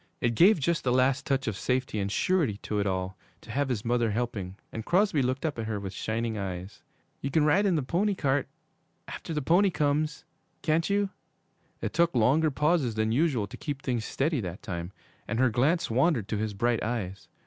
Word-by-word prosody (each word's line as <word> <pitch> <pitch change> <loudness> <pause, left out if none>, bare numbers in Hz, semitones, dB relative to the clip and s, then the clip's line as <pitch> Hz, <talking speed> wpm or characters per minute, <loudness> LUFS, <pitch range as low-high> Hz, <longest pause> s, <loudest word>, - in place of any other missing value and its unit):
It 120 -1 +1
gave 180 - +6
just 170 +3 0
the 125 - +1
last 130 +1 +2
touch 135 -1 +1
of 110 - -1
safety 125 -1 -1
and 100 0 -1
surety 160 - +1
to 105 - -1
it 100 - 0
all 95 0 -2 0.3
to 110 - -10
have 140 +3 0
his 115 -4 -2
mother 120 -1 +2
helping, 105 -4 -3 0.2
and 110 - -5
Crosby 180 - +2
looked 130 +4 -1
up 145 -6 -2
at 110 - -3
her 110 -2 -2
with 95 -1 -6
shining 110 +2 -2
eyes. 95 0 -6 0.4
'You 140 - -2
can 150 +2 +3
ride 200 +7 +4
in 185 - +2
the 150 - 0
pony 195 +9 +1
cart, 135 -4 0 0.6
after - - -7
the 150 -3 -1
pony 185 +7 +4
comes, 150 -1 0 0.4
can't 160 +2 +1
you?' 200 -1 +1 0.7
It - - -3
took 170 -2 +2
longer 135 +8 +4
pauses 150 -4 +1
than 110 0 +1
usual 130 -4 +2
to 120 +6 -10
keep 145 -3 -5
things 120 -4 -1
steady 140 +3 0
that 90 +1 -6
time, 85 -1 -5 0.4
and 115 - -2
her 130 -1 +3
glance 135 +6 +1
wandered 130 - +2
to 110 - -1
his 105 -1 -2
bright 120 +1 +1
eyes. 105 -5 -3
125 Hz, 205 wpm, -28 LUFS, 110-155 Hz, 0.7 s, gave